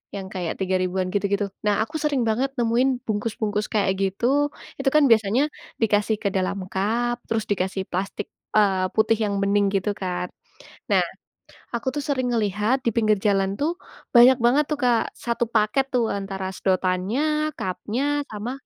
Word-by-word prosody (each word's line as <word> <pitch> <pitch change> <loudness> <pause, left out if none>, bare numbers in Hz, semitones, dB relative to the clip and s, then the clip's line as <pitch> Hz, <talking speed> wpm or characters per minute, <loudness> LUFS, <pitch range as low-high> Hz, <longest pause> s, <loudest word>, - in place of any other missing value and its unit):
yang 195 -1 -5
kayak 175 -3 -2
Rp3.000-an 185 -1 0
gitu-gitu. 200 0 0 0.2
Nah, 205 0 +2
aku 305 +8 -10
sering 285 -5 +1
banget 250 +5 +1
nemuin 245 +2 +1
bungkus-bungkus 210 -1 -1
kayak 205 -3 +2
gitu 245 +10 +1 0.3
itu. 270 - +3
Kan 305 -1 +6
biasanya 220 +3 +4 0.4
dikasih 210 0 +2
ke 200 - +2
dalam 190 +1 0 0.2
cup, 235 +5 0
terus 225 -1 0
dikasih 190 0 -1
plastik, 195 +3 -3 0.3
eee, 190 -3 +3
putih 220 0 +3
yang 200 -1 -1
bening 200 0 +3
gitu 195 +1 +1
kan. 180 -1 -3 0.6
Nah, - - +5 0.7
aku 235 +1 -3
tuh 290 - -2
sering 260 -3 0
ngelihat 215 +3 +1
di 235 - +3
pinggir 215 -2 +3
jalan 195 -1 +1
tuh, 325 +5 0 0.4
banyak 245 +2 +9
banget 275 +5 +4
tuh 305 - +1
Kak 240 -2 +2
satu 235 0 0
paket 220 +5 +2
tuh 240 -2 +3
antara 195 -1 -4
sedotannya, 210 +14 0
cup-nya, 210 +7 -3 0.3
sama 215 +3 -4
210 Hz, 155 wpm, -24 LUFS, 195-240 Hz, 0.7 s, banyak